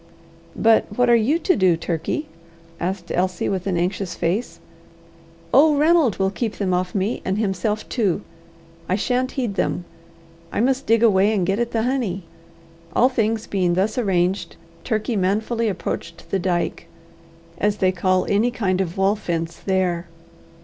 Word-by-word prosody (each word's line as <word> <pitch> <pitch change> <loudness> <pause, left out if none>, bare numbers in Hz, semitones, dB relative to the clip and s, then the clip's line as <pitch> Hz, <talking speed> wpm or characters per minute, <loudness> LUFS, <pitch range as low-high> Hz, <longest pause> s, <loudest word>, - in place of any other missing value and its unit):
"But 225 0 +4
what 245 -1 +4
are - - +7
you 235 +8 +3
to 365 +2 +2
do, 185 -4 +3
Turkey?" 170 - -3 0.5
asked 180 0 -3
Elsie, 180 0 0
with 190 -1 -2
an 185 -3 0
anxious 180 +1 -2
face. 180 +8 -2 0.9
"Oh, 295 +2 +6
Ranald 310 - +4
will 190 0 +1
keep 220 +1 -3
them 190 -3 -1
off 180 +1 -1
me 200 +4 -1
and 190 +1 -1
himself 210 0 -1
too. 205 -5 0 0.7
I 185 - +3
shan't 250 +4 0
heed 245 -6 -2
them. 180 -2 -1 0.7
I - - -2
must 260 +3 +1
dig 230 +1 +4
away, 205 -2 +4
and 185 -4 +1
get 195 +4 0
at 240 0 0
the 225 -1 -1
honey." 235 -8 -1 0.7
All 250 - +5
things 225 -3 0
being 180 -3 0
thus 200 +4 +1
arranged, 185 -5 0 0.3
Turkey 220 +1 -1
manfully 215 +4 0
approached 170 -3 -5
the 195 - +1
dyke, 175 -1 -1 0.7
as 210 0 +1
they 185 -2 +3
call 185 0 +1
any 215 +4 +2
kind 195 -6 0
of 180 0 -4
wall 195 +2 +3
fence 170 -5 -3
there. 185 -3 -1
200 Hz, 160 wpm, -22 LUFS, 185-230 Hz, 0.9 s, are